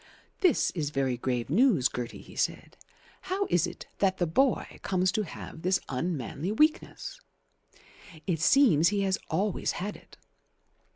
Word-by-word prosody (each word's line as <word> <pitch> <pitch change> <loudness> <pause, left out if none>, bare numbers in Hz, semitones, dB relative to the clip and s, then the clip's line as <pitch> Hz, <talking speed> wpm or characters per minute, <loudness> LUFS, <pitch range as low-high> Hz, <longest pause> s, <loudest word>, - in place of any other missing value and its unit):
"This 365 -4 +3
is 155 -5 -2
very 135 -3 0
grave 120 -1 -2
news, 195 - +4
Gertie," 120 -1 -6
he - - -14
said. - - -2 0.5
"How 390 +2 0
is 175 0 +3
it 175 - -9
that 190 -1 +2
the 175 - +1
boy 250 +11 +1
comes 185 -1 +1
to 215 - 0
have 165 -3 -8
this 185 +2 +2
unmanly 150 - -2
weakness?" 310 - 0 1.0
"It 165 -4 -1
seems 170 - +5
he 205 +1 +1
has 190 -1 +1
always 200 0 0
had 205 +4 -4
it." - - -17
180 Hz, 150 wpm, -28 LUFS, 150-210 Hz, 1.0 s, seems